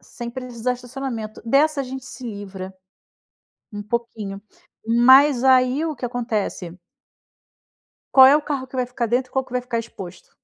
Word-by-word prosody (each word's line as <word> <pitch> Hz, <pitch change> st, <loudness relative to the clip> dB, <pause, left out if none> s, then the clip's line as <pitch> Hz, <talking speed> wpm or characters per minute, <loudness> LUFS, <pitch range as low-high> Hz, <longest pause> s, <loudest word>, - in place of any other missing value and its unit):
sem 240 Hz, -1 st, -8 dB
precisar 250 Hz, -1 st, -3 dB
estacionamento. 245 Hz, -3 st, -6 dB
Dessa 285 Hz, +5 st, +2 dB
a -, -, -2 dB
gente 260 Hz, 0 st, -7 dB
se 255 Hz, 0 st, -10 dB
livra 195 Hz, -3 st, -7 dB, 1.0 s
um 205 Hz, 0 st, -6 dB
pouquinho, 210 Hz, -3 st, -4 dB, 0.5 s
mas 260 Hz, +3 st, +6 dB
aí 260 Hz, +3 st, +4 dB
o 320 Hz, -2 st, -2 dB
que 250 Hz, -, -7 dB
acontece? 215 Hz, -7 st, -3 dB, 1.3 s
Qual 265 Hz, -1 st, +9 dB
é 275 Hz, +2 st, +7 dB
o 305 Hz, -, -2 dB
carro 280 Hz, -3 st, -3 dB
que 260 Hz, -, -10 dB
vai 255 Hz, -, +1 dB
ficar 245 Hz, -1 st, -3 dB
dentro 250 Hz, +3 st, -1 dB
e -, -, -33 dB
qual 265 Hz, 0 st, 0 dB
que 255 Hz, -, -17 dB
vai 250 Hz, -, 0 dB
ficar 240 Hz, -2 st, -3 dB
exposto? 190 Hz, -5 st, -9 dB
245 Hz, 165 wpm, -22 LUFS, 225-260 Hz, 1.3 s, Qual